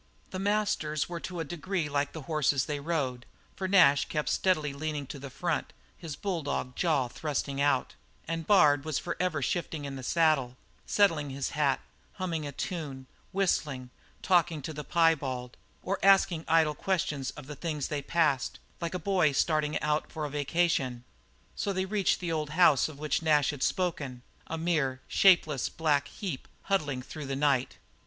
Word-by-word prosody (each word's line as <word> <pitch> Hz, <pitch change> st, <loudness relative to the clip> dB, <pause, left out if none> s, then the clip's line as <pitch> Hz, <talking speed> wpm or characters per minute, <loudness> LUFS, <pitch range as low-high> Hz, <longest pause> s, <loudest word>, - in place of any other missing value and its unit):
The 185 Hz, -, -4 dB
masters 200 Hz, -7 st, 0 dB
were 175 Hz, -1 st, -5 dB
to 180 Hz, 0 st, -6 dB
a -, -, -3 dB
degree 175 Hz, +2 st, -2 dB
like 145 Hz, 0 st, -1 dB
the 160 Hz, -, -8 dB
horses 145 Hz, -3 st, +1 dB
they 145 Hz, -1 st, -3 dB
rode, 140 Hz, -5 st, -2 dB, 0.3 s
for 190 Hz, -, -3 dB
Nash 160 Hz, -8 st, +5 dB
kept 150 Hz, -1 st, -2 dB
steadily 155 Hz, -7 st, +1 dB
leaning 150 Hz, 0 st, -3 dB
to 140 Hz, +1 st, -8 dB
the 140 Hz, 0 st, -7 dB
front, 165 Hz, +4 st, -2 dB, 0.2 s
his 160 Hz, -4 st, -7 dB
bulldog 150 Hz, -9 st, -3 dB
jaw 155 Hz, -8 st, +1 dB
thrusting 140 Hz, +1 st, -3 dB
out; 140 Hz, -3 st, +2 dB, 0.3 s
and 165 Hz, -1 st, -3 dB
Bard 145 Hz, -8 st, +5 dB
was 155 Hz, -2 st, -1 dB
forever 170 Hz, -4 st, -1 dB
shifting 160 Hz, +1 st, -2 dB
in 135 Hz, -1 st, -5 dB
the -, -, -6 dB
saddle, 135 Hz, -4 st, +2 dB, 0.3 s
settling 165 Hz, -8 st, +3 dB
his 135 Hz, 0 st, -3 dB
hat, 145 Hz, -2 st, +1 dB, 0.3 s
humming 170 Hz, -6 st, -3 dB
a -, -, -5 dB
tune, 140 Hz, -4 st, -5 dB, 0.3 s
whistling, 150 Hz, -10 st, 0 dB, 0.3 s
talking 170 Hz, -5 st, +2 dB
to 160 Hz, -, -5 dB
the 150 Hz, 0 st, -6 dB
piebald, 140 Hz, -8 st, +1 dB, 0.3 s
or 195 Hz, +2 st, -1 dB
asking 190 Hz, -4 st, +4 dB
idle 160 Hz, -1 st, +4 dB
questions 150 Hz, -7 st, -1 dB
of 150 Hz, -, -8 dB
the 150 Hz, +2 st, -7 dB
things 150 Hz, -1 st, -3 dB
they 150 Hz, -2 st, -2 dB
passed, 145 Hz, -3 st, +1 dB, 0.2 s
like 170 Hz, +1 st, -2 dB
a -, -, +1 dB
boy 180 Hz, -3 st, +2 dB
starting 150 Hz, +1 st, +1 dB
out 150 Hz, 0 st, 0 dB
for 155 Hz, -2 st, -3 dB
a 145 Hz, -, -5 dB
vacation. 145 Hz, -4 st, 0 dB, 0.5 s
So 200 Hz, -, -1 dB
they 190 Hz, -1 st, -1 dB
reached 200 Hz, 0 st, +1 dB
the 175 Hz, -2 st, -3 dB
old 155 Hz, -2 st, -1 dB
house 155 Hz, -6 st, +5 dB
of 150 Hz, -, -10 dB
which 150 Hz, +2 st, -1 dB
Nash 150 Hz, -4 st, +3 dB
had 145 Hz, -3 st, -8 dB
spoken 140 Hz, -10 st, -1 dB, 0.2 s
a 165 Hz, -, -3 dB
mere, 150 Hz, -6 st, 0 dB
shapeless, 160 Hz, -8 st, +4 dB
black 145 Hz, -3 st, +1 dB
heap 180 Hz, -11 st, -6 dB, 0.2 s
huddling 145 Hz, -10 st, 0 dB
through 150 Hz, +1 st, -7 dB
the 135 Hz, -, -2 dB
night. 135 Hz, -2 st, +1 dB
155 Hz, 170 wpm, -29 LUFS, 140-170 Hz, 0.5 s, Nash